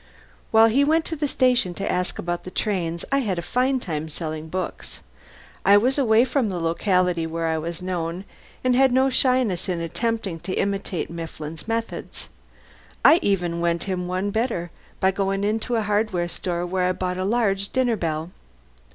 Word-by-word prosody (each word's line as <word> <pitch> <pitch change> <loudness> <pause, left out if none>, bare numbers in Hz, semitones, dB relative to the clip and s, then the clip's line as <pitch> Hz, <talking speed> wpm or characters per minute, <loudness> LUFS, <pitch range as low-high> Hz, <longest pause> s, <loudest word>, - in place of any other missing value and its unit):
While 220 0 +6
he 240 +5 +4
went 320 +2 +2
to 325 - -3
the 295 -1 -1
station 250 -10 +2
to 195 - -3
ask 180 0 -1
about 175 0 -3
the - - -7
trains 175 -4 -2
I 275 - +3
had 205 -9 -1
a 170 - -3
fine 255 +7 +1
time 160 -7 -4
selling 155 0 -5
books. 185 +1 -5 0.6
I 200 +1 +7
was 255 +7 +2
away 230 -2 +4
from 260 -4 0
the 180 -2 -3
locality 175 0 +1
where 165 +1 -3
I 160 -1 0
was 170 +2 -5
known, 180 0 -3 0.4
and 255 -1 +3
had 265 0 +5
no 260 +2 +3
shyness 250 -10 +2
in 175 -2 -1
attempting 195 +1 -2
to 185 +3 -4
imitate 195 -3 -2
Mifflin's 165 -1 -7
methods. 230 0 -4 0.8
I 330 - +8
even 175 -4 0
went 170 -1 0
him 180 -2 -3
one 185 +3 -1
better 220 -7 -1 0.3
by 190 - +3
going 195 0 -1
into 220 +3 0
a 225 - +1
hardware 205 -4 0
store 175 0 -3
where 180 +1 0
I 185 - +2
bought 180 0 -3
a - - 0
large 200 -2 +1
dinner 255 -3 +1
bell. 165 -2 -3
190 Hz, 180 wpm, -23 LUFS, 170-230 Hz, 0.8 s, I